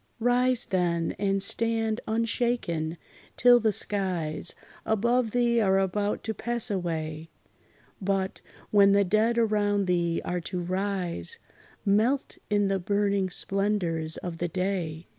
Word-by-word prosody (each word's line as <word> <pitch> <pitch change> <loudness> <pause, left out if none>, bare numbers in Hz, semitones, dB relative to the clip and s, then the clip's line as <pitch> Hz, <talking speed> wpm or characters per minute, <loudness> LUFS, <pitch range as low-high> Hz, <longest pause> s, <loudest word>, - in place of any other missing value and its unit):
Rise 245 +1 +2
then, 170 -3 0
and 195 -1 +1
stand 225 +1 0
unshaken, 220 -8 -1 0.4
till 245 0 +7
the 220 -2 +2
skies 180 -6 -1 0.3
Above 235 +2 +1
thee 235 0 +2
are 195 -2 +3
about 205 +2 -1
to 220 - -2
pass 235 +2 -1
away; 160 -4 -3 0.7
But, 190 0 -1 0.3
when 200 -1 +6
the 200 0 +4
dead 215 +5 +2
around 205 -3 +2
thee 170 -2 +1
are 180 0 -2
to 180 +2 -4
rise, 185 - -2 0.5
Melt 220 +7 +1
in 205 -1 +2
the 195 0 0
burning 200 0 0
splendors 180 -5 -1
of 170 -2 -6
the 175 - 0
day! 175 -2 -3
200 Hz, 125 wpm, -27 LUFS, 175-220 Hz, 0.7 s, till